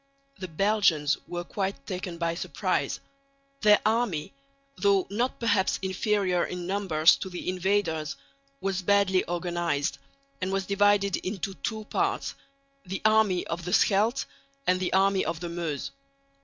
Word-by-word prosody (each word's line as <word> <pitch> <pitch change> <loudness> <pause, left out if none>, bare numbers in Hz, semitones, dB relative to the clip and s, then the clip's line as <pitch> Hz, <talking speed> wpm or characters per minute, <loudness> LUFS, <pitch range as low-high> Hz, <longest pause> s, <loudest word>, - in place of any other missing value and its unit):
The 185 - -4
Belgians 170 -4 +2
were 175 0 -4
quite 195 +2 -3
taken 180 -2 -5
by 170 -1 0
surprise. 170 - -1 0.6
Their 210 -1 +6
army, 215 - 0 0.4
though 200 -4 +3
not 240 +5 -1
perhaps 205 -5 +2
inferior 190 -1 +1
in 180 -1 -4
numbers 185 -5 +4
to 190 - -5
the 180 - -7
invaders, 180 -5 0 0.5
was 190 -1 -1
badly 195 -1 +3
organised, 175 -4 -1 0.4
and 185 +1 -1
was 195 0 -1
divided 200 -1 +3
into 195 0 -4
two 220 +2 -4
parts - - -1 0.5
the 190 +1 -5
army 215 -4 +4
of 170 +1 -4
the 180 +2 -3
Scheldt 215 +4 +3 0.4
and 185 0 +3
the 185 - -1
army 195 0 +3
of 165 0 -3
the 175 0 -5
Meuse. 170 -5 -3
190 Hz, 140 wpm, -27 LUFS, 175-200 Hz, 0.6 s, Their